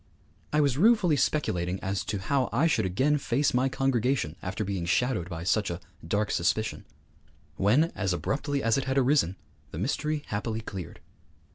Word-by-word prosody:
I 150 - +3
was 140 -2 +1
ruefully 205 -6 +5
speculating 90 - 0
as 95 +1 -2
to 105 - -2
how 130 +7 0
I 140 +7 +2
should 160 - +2
again 140 +11 +1
face 140 +2 +1
my 130 +2 +2
congregation 130 - 0
after 95 +4 -3
being 95 -3 -2
shadowed 95 -3 +1
by 85 -2 -5
such 105 +3 +1
a 85 0 -4 0.3
dark 105 +4 0
suspicion. 90 +6 0 0.7
When, 130 - +3
as 100 -3 -1
abruptly 140 - -1
as 115 +3 +3
it 135 - -3
had 135 +1 -1
arisen, 130 - +3 0.3
the - - -8
mystery 145 - -1
happily 110 +2 -3
cleared. 95 -7 -8
115 Hz, 165 wpm, -28 LUFS, 95-140 Hz, 0.7 s, ruefully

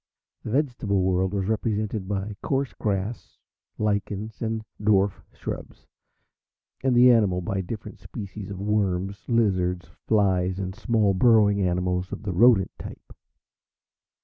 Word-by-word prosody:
The - - -7
vegetable 120 -7 0
world 95 0 +1
was 100 -2 -1
represented 105 -1 -1
by 100 +1 -3
coarse 140 -3 -1
grass, 100 +1 -3 0.4
lichens, 105 0 -2
and 110 -1 -2 0.2
dwarf 100 -2 +2
shrubs, - - -7 1.0
and 130 -2 +2
the 125 +1 +8
animal 105 -6 +3
by 95 +2 -2
different 105 +3 -7
species 100 -2 -8
of 95 -2 -6
worms, 100 -1 -1
lizards, 95 -6 +1 0.2
flies, 95 -4 +2
and 95 -1 -4
small 110 -2 +1
burrowing 105 -1 +4
animals 90 0 0
of - - -6
the 100 -3 -3
rodent 105 0 +5
type. - - -10
100 Hz, 125 wpm, -25 LUFS, 95-110 Hz, 1.0 s, the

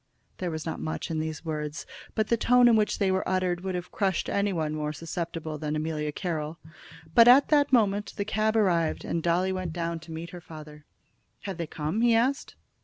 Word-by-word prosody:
There 180 - -2
was 160 -1 -5
not 160 - -4
much 160 +2 -4
in 160 - -1
these 160 +1 -4
words, 150 -1 -4 0.3
but 220 -1 0
the 235 - +4
tone 245 +2 +5
in 235 - +6
which 215 -1 +1
they 195 -2 +2
were 190 -1 0
uttered 185 -2 0
would 190 -1 -3
have 180 0 -5
crushed 195 -3 0
any 200 0 +1
one 160 -4 -1
more 150 -1 -2
susceptible 165 0 -5
than 150 0 -2
Amelia 155 -1 -2
Carroll. 160 -1 -4 0.6
But 230 +4 +7
at 260 +3 +7
that 290 -2 +3
moment 210 -4 +2
the 200 - -1
cab 215 +1 0
arrived, 175 -7 +1
and 170 - -1
Dolly 175 +3 +1
went 185 -3 -3
down 170 -1 -3
to 160 +1 -12
meet 165 +1 -6
her 175 - -9
father. 150 -2 -11 0.6
"Have 195 -4 -5
they 170 -2 -3
come?" 155 +9 -2
he 235 -1 +4
asked. 260 +5 0
175 Hz, 210 wpm, -27 LUFS, 155-205 Hz, 0.6 s, But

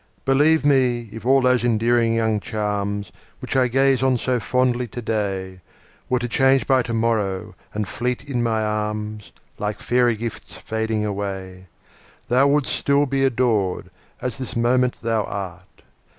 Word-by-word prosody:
Believe 145 +3 +3
me, 125 -5 +2
if 115 +2 -7
all 135 +1 +5
those 125 -2 +3
endearing 115 0 +2
young 110 -2 +1
charms, 105 -2 -3 0.3
Which - - -5
I 130 -1 +4
gaze 135 +1 +2
on 130 -1 +3
so 125 +1 0
fondly 125 +1 0
today, 100 -5 -3 0.5
Were 125 - +2
to 120 0 -2
change 135 0 +3
by 130 -1 +3
to 115 -1 -4
morrow, 110 -5 -1 0.2
and 105 -1 -3
fleet 125 +6 -3
in 125 -4 -1
my 110 -2 0
arms, 105 0 -3 0.3
Like 105 0 -3
fairy 120 -1 +2
gifts 115 +1 -7
fading 110 -1 -2
away, 95 -2 -5 0.6
Thou 130 +3 +4
wouldst 145 -1 +1
still 140 +1 +2
be 135 0 0
adored, 115 -7 0 0.3
as 125 +2 -4
this 130 - -6
moment 125 +2 +2
thou 115 -2 +1
art. 95 -3 -7
115 Hz, 150 wpm, -22 LUFS, 105-130 Hz, 0.6 s, all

